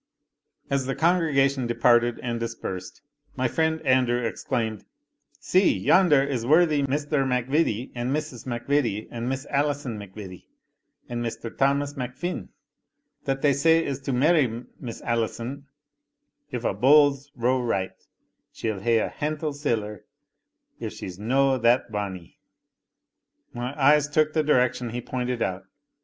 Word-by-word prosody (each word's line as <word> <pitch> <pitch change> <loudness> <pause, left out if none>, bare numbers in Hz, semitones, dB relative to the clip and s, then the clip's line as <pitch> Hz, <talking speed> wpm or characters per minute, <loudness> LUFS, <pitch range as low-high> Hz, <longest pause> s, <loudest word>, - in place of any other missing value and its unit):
As 135 -2 0
the 135 - -1
congregation 140 -7 +2
departed 120 0 +3
and 120 -1 -2
dispersed, 115 -5 -6 0.3
my 130 - +1
friend 160 +5 0
Andrew 130 -2 +3
exclaimed, 110 -1 -2 0.6
"See, 185 +1 +3
yonder 165 -8 +4
is 135 -4 -2
worthy 155 +2 +4
Mr. 145 +1 0
MacVittie, 130 -1 0
and 120 0 -3
Mrs. 140 -4 -3
MacVittie, 120 -3 -1
and 120 +1 -3
Miss 135 +2 -3
Alison 140 -5 -1
MacVittie, 95 -2 -10 0.6
and 120 0 -3
Mr. 115 0 -5
Thamas 140 +1 +1
MacFin, 140 +7 -5 0.8
that 135 -1 -2
they 145 -1 +5
say 165 +4 +3
is 140 -1 -3
to 140 0 -4
marry 130 -3 +2 0.2
Miss 120 -4 -7
Alison, 120 +4 -3 0.8
if 125 - -4
a' - - +1
bowls 140 +4 +4
row 125 +1 +1
right 95 -6 -1 0.6
she'll 110 -3 -3
hae 115 +4 +2
a 110 - +1
hantle 150 0 -3
siller, 110 -8 -3 0.7
if - - -5
she's 90 0 -8
no 135 +4 +2
that 120 0 +2
bonny." 95 -5 -5 1.1
My 125 +4 -5
eyes 150 +1 +5
took 155 +1 +2
the 155 - +2
direction 125 -4 +1
he 120 +2 -4
pointed 125 -1 -2
out. 95 +1 -3
130 Hz, 135 wpm, -25 LUFS, 115-145 Hz, 1.1 s, they